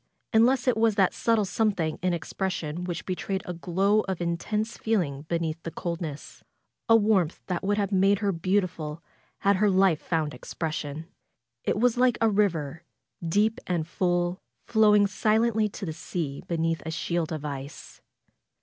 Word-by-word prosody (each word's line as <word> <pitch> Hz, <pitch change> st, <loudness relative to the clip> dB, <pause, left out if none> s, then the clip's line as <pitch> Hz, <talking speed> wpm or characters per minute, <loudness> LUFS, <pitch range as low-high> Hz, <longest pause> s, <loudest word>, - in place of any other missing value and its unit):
Unless 245 Hz, +3 st, +4 dB
it 250 Hz, -, +3 dB
was 225 Hz, -2 st, +3 dB
that 195 Hz, -3 st, +3 dB
subtle 225 Hz, -3 st, +2 dB
something 190 Hz, -6 st, 0 dB
in 180 Hz, 0 st, +1 dB
expression 175 Hz, -1 st, -3 dB
which 175 Hz, -3 st, -4 dB
betrayed 190 Hz, +1 st, -3 dB
a 180 Hz, -, -4 dB
glow 190 Hz, +5 st, +1 dB
of 190 Hz, -2 st, -2 dB
intense 195 Hz, +6 st, -2 dB
feeling 155 Hz, -10 st, -1 dB
be 170 Hz, -, +1 dB
neath 165 Hz, 0 st, -3 dB
the 165 Hz, -, -5 dB
coldness; 165 Hz, -3 st, -6 dB, 0.5 s
a 225 Hz, -, +8 dB
warmth 205 Hz, -6 st, +2 dB
that 180 Hz, 0 st, -3 dB
would 205 Hz, +1 st, +1 dB
have 200 Hz, -1 st, 0 dB
made 195 Hz, +1 st, +4 dB
her 200 Hz, 0 st, 0 dB
beautiful 170 Hz, -3 st, -1 dB, 0.4 s
had 200 Hz, -1 st, +3 dB
her 210 Hz, +1 st, +3 dB
life 190 Hz, -4 st, +3 dB
found 155 Hz, -3 st, -1 dB
expression. 155 Hz, -2 st, -5 dB, 0.6 s
It -, -, +1 dB
was 245 Hz, 0 st, +3 dB
like 250 Hz, -1 st, +4 dB
a 225 Hz, -1 st, +3 dB
river 165 Hz, -7 st, 0 dB, 0.2 s
— 170 Hz, -, -9 dB
deep 220 Hz, +2 st, +3 dB
and 170 Hz, -3 st, -1 dB
full, 175 Hz, 0 st, 0 dB, 0.2 s
flowing 210 Hz, -2 st, +5 dB
silently 220 Hz, +1 st, +2 dB
to 195 Hz, -, -7 dB
the 160 Hz, -, -4 dB
sea 155 Hz, -3 st, -4 dB
beneath 165 Hz, -1 st, 0 dB
a 160 Hz, -, -5 dB
shield 165 Hz, 0 st, -2 dB
of 155 Hz, -2 st, -4 dB
ice. 140 Hz, 0 st, -7 dB
185 Hz, 165 wpm, -27 LUFS, 165-210 Hz, 0.6 s, a